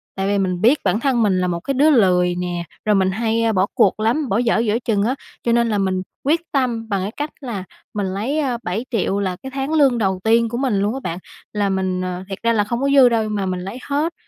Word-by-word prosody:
tại 195 0 -1
vì 200 0 +1
mình 185 -2 -1
biết 250 +7 +4
bản 215 - +1
thân 245 -3 +1
mình 190 -3 +2
là 180 - +1
một 170 -1 -2
cái 275 +10 -3
đứa 290 +4 +4
lười 180 -8 +3
nè, 175 -1 -3 0.2
rồi 210 -1 +3
mình 190 -1 +2
hay, 225 +2 0
a, 225 - +2
bỏ 190 -1 +2
cuộc 200 +1 +3
lắm, 245 +6 0
bỏ 195 - +1
dở 230 -2 +2
giữa 225 0 +1
chừng 210 -4 0
á. 250 +5 0 0.3
Cho 235 - +1
nên 235 0 +3
là 210 - 0
mình 190 -1 0 0.2
quyết 315 +4 +2
tâm 240 -5 -1
bằng 200 -3 0
cái 200 - -3
cách 295 +1 -2
là 230 -8 -5 0.3
mình 205 -2 -1
lấy, 245 +10 -1
a, 260 -5 0
7.000.000 205 0 -1
là 185 -2 -1
cái 265 - -6
tháng 275 +3 -2
lương 275 -6 +4
đầu 190 -4 0
tiên 230 +1 +3
của 235 - -4
mình 250 -6 0
luôn 205 +3 0
á 270 - -4
bạn, 170 +2 -4 0.3
là 205 -1 0
mình 190 -1 -1
ờ, 180 0 -4
thiệt 195 - -4
ra 230 0 +3
là 210 -2 +2
không 235 +4 -3
có 275 - +1
dư 260 -3 +7
đâu 230 -2 +1
nhưng 215 -1 -3
mà 195 - -1
mình 185 -1 -2
lấy 195 +7 -6
hết 300 +4 0
215 Hz, 275 wpm, -20 LUFS, 190-245 Hz, 0.3 s, dư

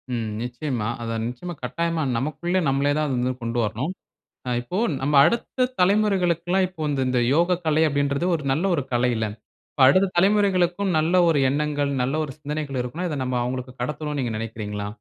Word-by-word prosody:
ம். 115 -2 -2
நிச்சயமா 120 -2 -3
அத 115 -1 -3
நிச்சயமா 125 +9 -6
கட்டாயமா 165 +5 -1
நமக்குள்ள 155 +7 -1
நம்மளே 140 +1 +2
தான் 155 -1 +1
அத 135 - -1
வந்து 125 +1 0
கொண்டு 115 +1 -2
வரணும். 110 - -2 0.6
ஆ - - -1
இப்போ 150 +10 -5 0.2
நம்ம 145 +2 +1
அடுத்த 250 +2 0
தலைமுறைகளுக்குலாம் 185 -2 +2
இப்ப 165 -4 -6
இநத 140 -2 0
இந்த 125 -1 +1 0.2
யோகக்கலை 170 -2 +2
அப்டின்றது 140 +2 0
ஒரு 150 - -5
நல்ல 155 +8 0
ஒரு 140 - -1
கலையில்ல! 120 -2 +1 0.4
இப்ப 135 - +2
அடுத்த 185 +8 +5
தலைமுறைகளுக்கும் 190 -1 +2
நல்ல 165 +4 +1
ஒரு 155 -3 +3
எண்ணங்கள், 145 0 0
நல்ல 130 +4 0
ஒரு 150 - -5
சிந்தனைகள் 150 -2 -4
இருக்குன்னா, 155 +9 -4
இத 150 - -3
நம்ம 125 -1 -1
அவுங்களுக்கு 125 +1 -4
கடத்தணுனு 150 +3 -3
நீங்க 120 -3 -1
நெனைக்கிறீங்களா? 105 -2 -5
145 Hz, 170 wpm, -24 LUFS, 125-175 Hz, 0.6 s, அடுத்த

